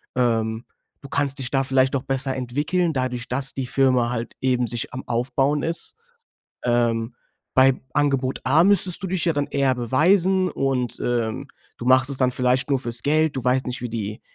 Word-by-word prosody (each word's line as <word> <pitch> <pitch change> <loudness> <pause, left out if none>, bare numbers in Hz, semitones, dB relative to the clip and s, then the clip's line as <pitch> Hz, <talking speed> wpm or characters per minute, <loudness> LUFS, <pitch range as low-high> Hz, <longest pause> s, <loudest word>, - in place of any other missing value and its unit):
Ähm, 115 -2 0 0.4
du 140 - -11
kannst 140 -1 0
dich 125 -2 -4
da 135 -1 +2
vielleicht 130 0 +2
auch 130 - -2
besser 135 0 -2
entwickeln, 145 +7 -1
dadurch, 125 -2 -3
dass 135 +2 -3
die 135 -2 -3
Firma 130 -3 +2
halt 120 -1 -4
eben 125 -2 +1
sich 120 +4 -5
am 130 - -6
Aufbauen 135 +4 0
ist. 165 0 -4 0.7
Ähm, 120 -1 0 0.4
bei 130 0 +4
Angebot 135 -3 0
A 150 +5 +4
müsstest 190 -2 +4
du - - -2
dich 185 -1 -1
ja 165 - +2
dann 145 -1 -1
eher 140 -2 +1
beweisen. 180 - +2
Und, 130 -4 -2
ähm, 115 -2 -2 0.3
du - - -7
machst 130 +1 +4
es 135 - -5
dann 130 -1 +3
vielleicht 125 +2 0
nur 140 - +3
fürs 120 -2 -1
Geld. 155 +1 +2
Du 125 - -4
weißt 130 +1 +1
nicht, 125 0 -4
wie 125 - -4
die 110 -2 -5
130 Hz, 190 wpm, -23 LUFS, 125-145 Hz, 0.7 s, bei